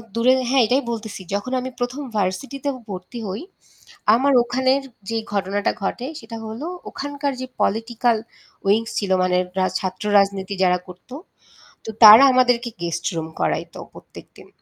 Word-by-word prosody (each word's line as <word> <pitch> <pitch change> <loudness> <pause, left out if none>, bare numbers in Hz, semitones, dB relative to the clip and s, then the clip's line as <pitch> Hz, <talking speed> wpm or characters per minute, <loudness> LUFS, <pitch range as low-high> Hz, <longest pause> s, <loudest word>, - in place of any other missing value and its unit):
দূরে 245 +3 +4 0.2
হ্যাঁ 265 -1 +4
এটাই 260 +4 +2
বলতেছি 220 -4 -6
যখন 205 +6 -2
আমি 255 - -4
১ম 250 +4 -3
ভার্সিটিতে 255 +9 -2 0.2
ভর্তি 185 +5 -7
হই, 195 +4 -4 0.7
আমার 275 +3 +2
ওখানের 260 +3 +1 0.3
যে 225 - -1 0.2
ঘটনাটা 200 0 0
ঘটে 240 +5 -2
সেটা 225 0 -9
হল, 220 +3 -7 0.3
ওখানকার 285 0 -3
যে 255 - -3
পলিটিক্যাল 230 +2 +1 0.5
উইংস 225 +3 +2
ছিল 200 -3 -1
মানে 180 0 +2 0.2
রা 185 - +3
ছাত্র 185 +3 -4
রাজনীতি 195 0 +1
যারা 180 -1 +3
করতো। 180 +7 -13 0.7
তো - - -6
তারা 215 +5 +11
আমাদেরকে 245 -1 +3
গেস্ট 170 0 -3
রুম 160 -1 -3
করাইত - - -1 0.2
প্রত্যেকদিন। - - -14
225 Hz, 145 wpm, -21 LUFS, 195-255 Hz, 0.7 s, তারা